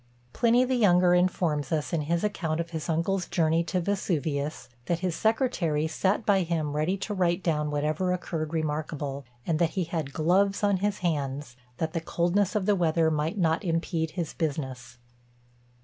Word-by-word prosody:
Pliny 240 +1 +4
the 260 - -1
younger 180 -7 +4
informs 175 -4 +1
us, 155 +1 -1
in 165 - +1
his 170 +4 -1
account 170 -6 -1
of 170 0 -3
his 160 0 -4
uncle's 175 +3 0
journey 165 -1 +2
to 185 - -1
Vesuvius, 160 -6 -2 0.2
that 170 0 0
his 180 -3 -1
secretary 215 - +1
sat 190 +7 0
by 195 -2 +4
him 160 -4 -1
ready 160 +6 0
to 205 +2 -4
write 180 -1 +1
down 150 -3 0
whatever 155 +5 0
occurred 165 -3 -3
remarkable; 150 -3 -3 0.2
and 160 -2 0
that 170 -2 +3
he 185 - +2
had 160 -4 -3
gloves 190 +7 +2
on 200 -1 +3
his 205 +1 -1
hands, 140 -5 -2 0.2
that 160 0 -2
the 165 - -1
coldness 175 +5 0
of 205 -3 +1
the 205 0 +3
weather 165 -2 +2
might 155 +6 -1
not 165 0 +1
impede 165 -2 -1
his 170 -3 -2
business. 130 -6 -4
165 Hz, 175 wpm, -27 LUFS, 155-185 Hz, 0.2 s, Pliny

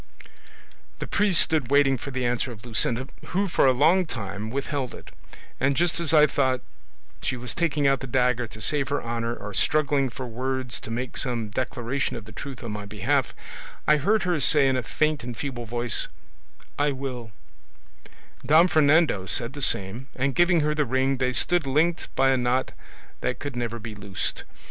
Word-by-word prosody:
"The - - -5
priest 200 -4 +2
stood 150 -7 +1
waiting 140 -1 +4
for 130 - -7
the 130 -2 -2
answer 125 +1 0
of 110 0 -11
Luscinda, 120 +2 +1 0.2
who 195 +2 0
for 165 - +3
a - - +6
long 160 +8 +3
time 105 -4 -5
withheld 135 0 -3
it; - - -13 0.5
and 135 +1 +1
just 170 0 +1
as 170 -3 -1
I 150 -2 +7
thought 130 -3 0 0.6
she 130 - -2
was 125 0 -3
taking 150 -4 0
out 135 -1 +3
the 135 - -6
dagger 125 -1 +1
to 110 0 -12
save 140 +4 +2
her 145 - -1
honour, 115 0 -2
or 105 -2 -8
struggling 145 -1 +2
for 130 +2 -7
words 130 +1 -3
to - - -10
make 120 +2 -4
some 120 -4 -1
declaration 125 +3 -2
of 115 - -7
the 110 - -12
truth 130 +3 -8
on 115 - -5
my 105 -1 -6
behalf, 115 +6 0 0.5
I 150 - +6
heard 205 +8 +2
her 175 -3 0
say 140 0 +5
in 130 - +2
a 130 - 0
faint 150 +6 -1
and 120 -2 -6
feeble 120 -4 -5
voice, 120 0 -1 0.7
'I 145 0 +2
will:' 130 -4 -6 1.1
Don 155 +6 +5
Fernando 155 - +3
said 120 +4 +1
the 145 - -7
same, 110 +2 0
and 135 +1 0
giving 175 +1 +3
her 150 0 +1
the 150 0 +1
ring 130 +1 0
they 130 0 0
stood 175 +3 +1
linked 160 +5 +1
by 135 0 +4
a 130 - +3
knot 125 +1 0 0.5
that - - -2
could 145 -3 -6
never 120 -1 -3
be 115 -1 -7
loosed. 100 -2 -2
130 Hz, 190 wpm, -25 LUFS, 120-145 Hz, 1.1 s, I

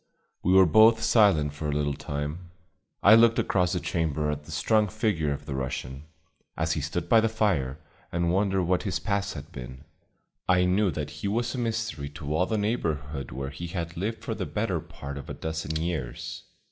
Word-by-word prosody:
We 90 - +2
were 95 0 +8
both 110 +7 +6
silent 90 -10 +4
for 75 0 -4
a - - 0
little 75 -1 0
time. 75 +5 -5 0.5
I 100 - +8
looked 115 0 +6
across 90 -1 +1
the 90 - 0
chamber 80 -4 -1
at 75 0 -5
the - - -11
strong 110 -1 +2
figure 95 -7 0
of 70 - -4
the 70 - -4
Russian, 65 +1 -4 0.5
as 80 0 0
he 80 - 0
stood 75 +4 -3
by 115 - +6
the 115 - +2
fire, 90 -12 0 0.3
and 85 0 +1
wondered 95 -1 +2
what 90 +1 +1
his 100 -4 -1
past 100 -2 -2
had - - -8
been. 65 +2 -9 0.7
I 90 0 +5
knew 95 +3 +3
that 75 -3 -4
he - - -1
was 120 +4 0
a 130 - -3
mystery 115 -11 -2
to 75 0 -3
all 90 +3 +2
the 110 - 0
neighborhood 75 - -2
where 65 +2 -5
he 85 +5 -6
had 85 0 -4
lived 105 +6 -3
for - - -2
the - - -4
better - - -1
part 70 0 -8
of - - -10
a - - -5
dozen 80 -1 -4
years. 80 -7 -4
85 Hz, 200 wpm, -27 LUFS, 75-105 Hz, 0.7 s, were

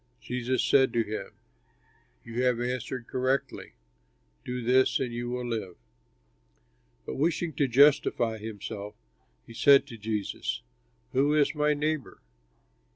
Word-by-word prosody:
Jesus 125 +1 -2
said 135 -3 +4
to 115 - +2
him, 110 0 -6 0.9
"You 115 +2 -3
have 125 -2 +2
answered 125 0 -3
correctly; 130 +2 -2 0.7
do 125 0 -4
this 130 +2 +3
and 125 -3 -2
you 120 0 -4
will 125 0 -3
live." 110 -7 -4 1.3
But - - -5
wishing 165 +2 0
to 140 - +2
justify 120 -4 +3
himself 105 -1 -7 0.5
he 115 - -12
said 140 +3 +6
to 120 -5 -10
Jesus, 105 -1 -3 0.5
"Who 145 +3 +3
is 150 -2 +3
my 150 0 +2
neighbor?" 150 -1 -2
125 Hz, 125 wpm, -28 LUFS, 115-140 Hz, 1.3 s, said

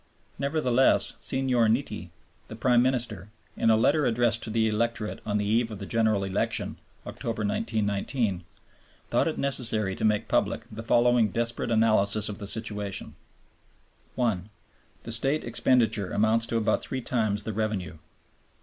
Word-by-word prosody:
Nevertheless 135 -3 +3
Signor 130 -3 +1
Nitti, 110 -6 -1 0.4
the - - -8
Prime 120 +1 +3
Minister, 120 -6 -1 0.3
in - - +1
a 110 - +6
letter 140 +7 +3
addressed 120 0 +1
to - - -4
the 110 0 +1
electorate 110 0 -2
on 105 -1 0
the 105 - -1
eve 115 +3 +1
of 105 - -7
the 100 - -7
General 110 -2 +1
Election 105 +2 -1 0.3
(Oct., - - -9
1919), 105 -2 -1 0.7
thought - - +2
it - - -2
necessary 110 -8 -1
to - - -6
make 105 0 +1
public - - 0
the 110 +1 -7
following 120 0 +3
desperate 115 +3 -2
analysis 110 -2 +2
of 100 - -6
the 100 - -6
situation: 105 -2 -4 1.0
(1) 110 -6 -1 0.5
The 115 - -6
State 135 +7 +3
expenditure 110 -6 +1
amounts 110 +2 +2
to 115 - 0
about 110 -1 +1
three 130 - -4
times 110 -4 -1
the 110 - -4
revenue. 105 -6 -3
110 Hz, 150 wpm, -27 LUFS, 105-120 Hz, 1.0 s, a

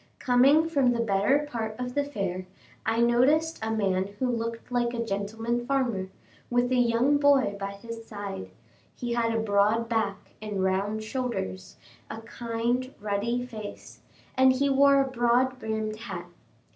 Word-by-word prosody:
Coming 275 +5 +4
from 275 -6 +2
the 235 - -2
better 230 +7 +2
part 225 -5 -4
of 250 0 -4
the 285 - +1
fair, 195 -9 -4 0.4
I 225 +1 +2
noticed 275 +8 +3
a 220 - -2
man 195 -4 0
who 260 - -1
looked 230 0 -4
like 240 -1 0
a 235 0 -2
gentleman 225 +4 -2
farmer, 240 -9 0 0.4
with 245 +1 +1
a - - +3
young 245 +4 +3
boy 280 -7 +4
by 195 0 -4
his 230 +3 -8
side; 200 - -6 0.5
he 240 -1 -3
had 230 -1 +1
a 225 - 0
broad 215 +2 +2
back 220 -4 0 0.2
and 210 -3 -2
round 200 +3 0
shoulders, 215 - -4 0.3
a 220 - -6
kind, 235 +3 -2
ruddy 215 +4 -1
face, 215 -4 -9 0.4
and 260 0 +5
he 275 +2 +1
wore 280 0 +5
a 270 - 0
broad 255 +1 +1
brimmed 220 -1 -3
hat. 230 +2 -6
230 Hz, 160 wpm, -27 LUFS, 215-255 Hz, 0.5 s, and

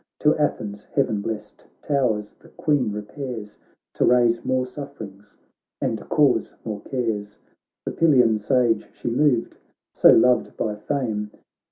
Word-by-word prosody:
To 150 0 +4
Athens' 105 -9 -2
heaven 110 -7 0
blest 110 0 -6 0.2
towers 120 -7 0
the - - -18
Queen 140 -8 0
repairs 105 0 -7 0.3
To - - 0
raise 120 -1 +3
more 130 0 0
sufferings, 110 -7 -10 0.4
and - - -1
to - - -12
cause 145 -4 +2
more 105 -3 -4
cares; 110 -5 -3 0.5
The - - -2
Pylian 125 -9 +4
Sage 115 0 +1
she 120 - -4
moved, 125 -2 +1 0.4
so - - +6
loved 125 0 +4
by 105 -2 -1
fame. 105 -3 -2
120 Hz, 135 wpm, -23 LUFS, 105-135 Hz, 0.5 s, so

